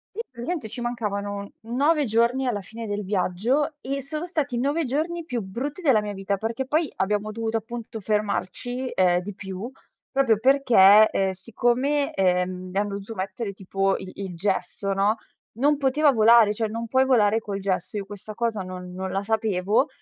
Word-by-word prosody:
Sì, - - -6
praticamente 255 +2 -4
ci 240 +3 -7
mancavano 205 -4 -3
9 285 +7 +2
giorni 235 +3 +2
alla 235 -5 0
fine 225 +4 -8
del 205 -1 -3
viaggio 215 - 0
e 275 +1 -3
sono 305 +4 -4
stati 300 -8 -2
i - - -1
9 290 +5 +1
giorni 320 +6 -2
più 250 -8 -3
brutti 255 - -5
della 265 -9 +4
mia 210 0 -4
vita, 195 0 -2
perché 225 +6 -3
poi 305 +2 0
abbiamo 210 +2 0
dovuto 225 0 -3
appunto 225 0 -7
fermarci, 215 +5 -2
uhm, 180 -1 +3
di 195 +3 -6
più, 195 +5 -7 0.4
proprio 260 -6 +3
perché, 220 -5 +6
ehm, 195 -1 0
siccome, 245 +8 0
ehm, 180 -1 0
mi 195 - -4
hanno 200 -1 0
dovuto 200 +3 -8
mettere 195 +3 -4
tipo 195 0 0
il 185 - -8
il 190 -3 -6
gesso, 195 +1 -2
no, 200 +3 +2 0.4
non 285 +5 +2
poteva 285 +2 +3
volare, 225 -2 +6
cioè 220 +1 -1
non 230 +2 -4
puoi 260 +2 +3
volare 225 -4 +4
col 205 -3 -5
gesso 190 0 -2
e 210 - 0
io 195 - -6
questa 205 +1 -9
cosa 225 -3 -1
non 180 0 -8
non 190 +1 -4
la 195 +1 -1
sapevo, 215 +3 +1
220 Hz, 185 wpm, -25 LUFS, 195-255 Hz, 0.4 s, perché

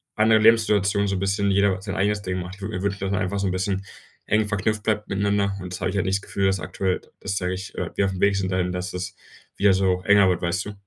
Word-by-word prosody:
anderen 110 0 +4
Lebenssituation 105 -3 +4
so 100 - -1
'n - - -2
bisschen 100 +1 0
jeder 95 -1 +2
sein 95 -1 -5
eigenes 105 +1 +1
Ding 95 -1 -3
macht, 90 +1 -7
ich 100 - -18
würde 110 +3 -4
mir 90 - -4
wünschen, 100 -1 -1
dass 95 0 -2
man 100 - 0
einfach 100 +1 -1
so 100 - 0
'n - - 0
bisschen 95 +1 -1 0.4
eng 110 +1 +2
verknüpft 105 +1 -1
bleibt 105 -1 0
miteinander 100 0 +1
und 90 0 -7
das - - -6
habe - - 0
ich 95 - -4
halt 95 - 0
nicht 95 +1 +1
das - - -10
Gefühl, 100 0 -2
dass 95 0 +2
aktuell, 90 +2 -2 0.2
das 95 - -3
sage 90 0 -1
ich, 95 +2 -7
äh, - - -3
wir 100 - +2
aufm 95 -1 -3
Weg 100 0 +4
sind 95 -1 -1
da 90 - 0
hin, 90 -1 0
dass 90 0 -4
das 90 +1 -5 0.4
wieder 100 -1 +4
so 95 -1 +1
enger 100 -2 +5
wird, 90 -2 0
weißt 85 +2 -1
du? 105 - -6
95 Hz, 285 wpm, -24 LUFS, 95-100 Hz, 0.4 s, enger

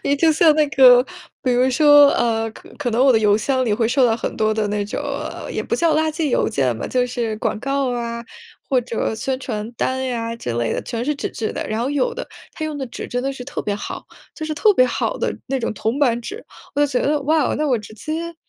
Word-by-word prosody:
你 285 - +2
就 320 +2 +4
像 310 0 +5
那 305 -1 +3
个 250 -3 +7 0.4
比 255 - +1
如 250 +1 +3
说， 290 +1 +7
呃， 225 -1 0
可 - - -15
可 245 - -1
能 235 +3 +2
我 270 - +6
的 225 - +4
邮 210 -1 +3
箱 260 +3 0
里 215 - +1
会 225 +1 +1
收 255 +2 +3
到 225 - +1
很 - - -4
多 215 0 +1
的 215 -1 0
那 205 0 -1
种 205 - -4
呃， - - -5
也 - - -2
不 - - -2
叫 335 -2 +2
垃 315 +1 +2
圾 310 -1 -2
邮 - - +1
件 130 -4 0
吧， - - -4
就 250 -1 +1
是 235 -3 -3
广 215 - -2
告 275 0 0
啊， 235 -1 -3 0.5
或 260 - +3
者 230 -2 -2
宣 260 +4 -2
传 220 -3 -4
单 260 +2 -1
呀 230 -2 -3
之 125 - -4
类 120 -1 0
的， - - -2
全 235 -1 -4
是 300 +3 0
纸 280 - -4
质 220 - -4
的， - - -4
然 215 +1 -2
后 260 - -1
有 470 +12 0
的 - - -5 0.3
它 315 - -4
用 305 -2 -4
的 265 - -3
纸 235 - -7
真 245 0 -2
得 275 +1 -1
是 255 -2 -8
特 285 - -5
别 205 - -2
好， 205 - -7 0.3
就 310 - -5
是 310 - -3
特 420 +8 +4
别 255 -9 +4
好 - - -2
的 - - -2
那 270 - -1
种 230 -3 -3
铜 220 +6 -2
板 245 -5 +2
纸。 415 - -8 0.3
我 285 - 0
就 290 - +5
觉 255 -3 -1
得 295 0 +1
哇， 305 0 +2
那 305 - 0
我 255 - +3
直 215 -1 -9
接 325 +8 -5
255 Hz, 280 characters per minute, -20 LUFS, 225-290 Hz, 0.5 s, 个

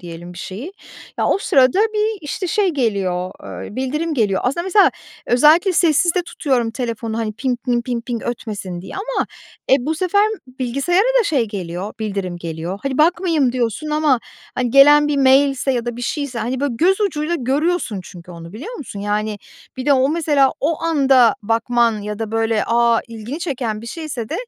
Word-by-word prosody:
diyelim 175 0 -9
bir 175 - -11
şeyi, 225 - -7 0.5
ya, - - +1
o - - +2
sırada 265 -3 +3
bir, 430 -1 +1
işte, 330 +5 -4
şey 410 +1 +1
geliyor, 195 - -1 0.3
eee, - - -10
bildirim 300 +5 -2
geliyor. 205 -7 +1
Aslında 275 +7 0
mesela 385 +2 +5 0.4
özellikle 310 +9 +5
sessizde 345 +1 +3
tutuyorum 260 -9 -1
telefonu, 230 -2 -4
hani, 220 -2 -2
pink, 250 +3 -3
mink, 240 -1 +1
pink, 240 -1 -3
pink 235 -3 -3
ötmesin 205 -7 -5
diye 190 - -10
ama, 460 +6 -2 0.4
e, 265 - +8
bu 315 - 0
sefer 370 +5 +2 0.2
bilgisayara 275 - 0
da 460 - 0
şey 265 - +1
geliyor, 185 0 -5
bildirim 195 -4 -3
geliyor. 170 +3 -5
Hadi 275 0 -2
bakmayayım 325 -5 +2
diyorsun 250 +5 -2
ama, 300 -4 +2 0.4
hani, 250 -1 -1
gelen 295 +3 +7
bir 290 - 0
mailse 270 0 +3
ya 240 -1 -1
da 240 -1 -3
bir 245 - -7
şeyse, 280 -1 -3
hani, 250 +3 -2
böyle 280 -4 -1
göz 380 +5 +3
ucuyla 340 -5 0
görüyorsun 270 - -1
çünkü 175 0 -12
onu, 170 0 -10
biliyor 300 - -7
musun? 225 - -7
Yani, 210 +1 -2 0.4
bir 260 +2 -5
de 285 - +5
o 265 0 +3
mesela 295 -4 +2
o 315 +3 -1
anda 270 -7 +4
bakman 230 +1 +1
ya 210 0 -5
da, 220 -1 -4
böyle, 225 -1 +1
a, 235 0 +3
ilgini 230 +6 -6
çeken 250 -10 -3
bir 235 - -9
şeyse 275 -6 -5
de, 320 - -4
255 Hz, 180 wpm, -19 LUFS, 220-310 Hz, 0.5 s, e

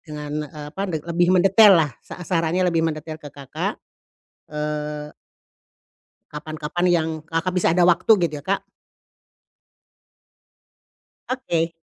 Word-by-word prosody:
dengan, 150 -1 -5
eee, 150 0 -9
apa, 195 - -4
lebih 170 +1 0
mendetail 195 +2 +7
lah 145 - -6
sa 180 - -10
sarannya 170 +1 0
lebih 170 -2 +2
mendetail 155 0 -5
ke 145 - -9
Kakak. 140 -1 -5 0.7
Eee 150 0 -4 1.2
kapan-kapan 155 +3 -4
yang 165 -2 +2 0.2
Kakak 165 +2 -2
bisa 180 -3 +2
ada 175 -1 +4
waktu, 180 +5 +3
gitu 155 - -5
ya, - - -30
Kak. 195 +1 -1 2.6
Oke. 170 -11 -1
165 Hz, 115 wpm, -22 LUFS, 150-175 Hz, 2.6 s, mendetail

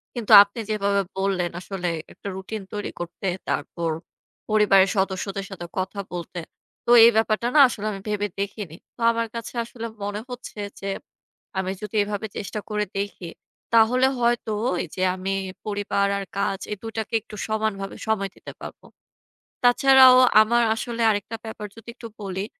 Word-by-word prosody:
কিন্তু 235 -4 -3
আপনি 205 +3 -10
যেভাবে 200 -1 +1 0.2
বললেন, 190 -3 0
আসলে 185 -2 -3 0.2
একটা - - -10
রুটিন 195 +3 -6
তৈরি 205 -1 -4
করতে, 175 +3 -5 0.2
তারপর 170 -1 -2 0.6
পরিবারের 200 -3 +5
সদস্যদের 195 +1 -1
সাথে 175 -3 -7
কথা 190 +2 -3
বলতে। 175 0 -5 0.5
তো - - -4 0.2
এই 235 - +8
ব্যাপারটা 220 +1 +1
না - - +7
আসলে 215 -3 -5
আমি 195 -1 -6
ভেবে 205 0 0
দেখিনি। 200 -4 -4 0.2
তো - - -28
আমার 230 0 -1
কাছে 230 - -6
আসলে 230 0 -8 0.2
মনে 205 +1 -3
হচ্ছে, 245 -3 -8 0.2
যে, 195 - -6 0.7
আমি 190 0 -1
যদি 210 +1 -7
এভাবে 205 +1 -4
চেষ্টা 210 +1 -4
করে 210 -1 0
দেখি 195 -3 -5 0.4
তাহলে 240 +3 +5
হয়তো 235 -2 +1 0.3
এই - - -7
যে, 185 - -4
আমি 190 +1 -3 0.3
পরিবার 205 -1 0
আর 195 - -5
কাজ 195 -1 0
এই 210 - -3
২ 225 - -5
টাকে 220 - -5
একটু 215 0 -12
সমানভাবে 215 -3 -2
সময় 200 -3 0
দিতে - - -10
পারবো। - - -10 0.8
তাছাড়াও 260 +1 +7 0.2
আমার 235 +2 +3
আসলে 235 +1 -4
আরেকটা 205 +2 -3
ব্যাপার 215 -1 -6
যদি 225 0 -12
একটু 235 - -9
বলি, 195 0 -3
205 Hz, 160 wpm, -24 LUFS, 195-225 Hz, 0.8 s, এই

